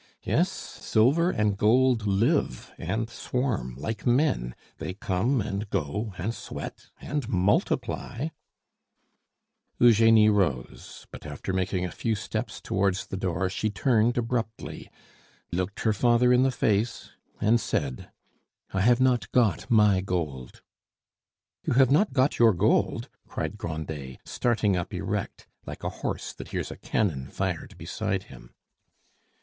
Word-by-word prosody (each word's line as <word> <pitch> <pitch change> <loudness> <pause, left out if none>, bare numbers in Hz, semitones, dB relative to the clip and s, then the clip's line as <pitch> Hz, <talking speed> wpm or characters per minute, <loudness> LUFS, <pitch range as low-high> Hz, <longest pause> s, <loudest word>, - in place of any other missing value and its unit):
Yes, - - +2
silver 140 +11 +1
and 105 - +1
gold 115 +2 +3
live 100 - +1
and 110 +7 -2
swarm 120 - -2
like 110 -2 -4
men; 120 - +1 0.2
they 95 - -4
come, 105 +7 0
and 100 +1 -4
go, 100 +4 -2
and 100 +8 -2
sweat, - - -8
and 145 -6 -3
multiply 105 - 0 0.7
" - - -50
Eugenie 115 -2 +6
rose; 85 -12 -1
but - - -9
after 75 +6 -5
making 95 0 0
a 90 - -4
few 115 +4 -1
steps 110 +1 -4
towards 95 0 0
the - - -6
door 95 -1 -1
she 110 +4 -1
turned 115 +4 +2
abruptly, 115 -2 -3 0.6
looked 90 +3 -2
her 110 - +2
father 120 +3 +4
in 125 - +5
the 135 - +4
face, 115 -2 0 0.3
and 115 +3 +3
said, 65 -4 -2 0.6
"I 95 - +1
have 120 +4 +4
not 125 -2 +2
got 110 -9 +2
my 105 -4 +5
gold." 80 -10 -4 1.0
"You - - 0
have 130 +1 +5
not 155 +5 +4
got 130 +2 +2
your 115 -2 +6
gold!" 85 - +1 0.2
cried - - -4
Grandet, 75 -4 -5
starting 110 -5 +1
up 90 -1 -3
erect, - - -3 0.2
like - - -7
a - - -1
horse - - -3
that - - -9
hears - - -4
a - - -8
cannon 75 -11 -1
fired 95 -4 -3
beside - - -2
him. - - -15
105 Hz, 135 wpm, -27 LUFS, 90-120 Hz, 1.0 s, Eugenie